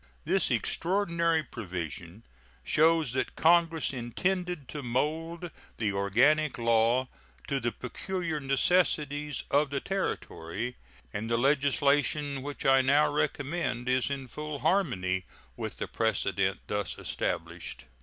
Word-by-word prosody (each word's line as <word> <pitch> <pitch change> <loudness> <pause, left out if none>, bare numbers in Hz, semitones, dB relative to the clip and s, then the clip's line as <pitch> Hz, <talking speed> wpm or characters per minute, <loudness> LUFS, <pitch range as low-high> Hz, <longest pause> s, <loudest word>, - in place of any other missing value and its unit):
This - - +2
extraordinary 170 -3 +1
provision 90 - -6 0.4
shows 160 - +3
that 130 - -2
Congress 165 -2 +3
intended 175 +6 -2
to 150 - -5
mold 160 +7 -2 0.3
the 105 -3 0
organic 125 +10 +3
law 115 +2 +3 0.4
to 140 - 0
the 120 -1 -1
peculiar 165 +6 -4
necessities 145 0 +1
of 145 +1 +3
the 140 0 -1
Territory, 125 - -3 0.4
and 110 +2 -3
the 115 - +2
legislation 140 +1 +2
which 145 +1 -6
I 135 0 +6
now 145 +3 +3
recommend 145 -3 -1
is 130 +1 +2
in 135 -2 -4
full 150 +3 -5
harmony 115 - +1 0.3
with - - -5
the - - -3
precedent 100 -3 0
thus 105 0 -2
established. 85 -7 -3
140 Hz, 115 wpm, -29 LUFS, 115-155 Hz, 0.4 s, I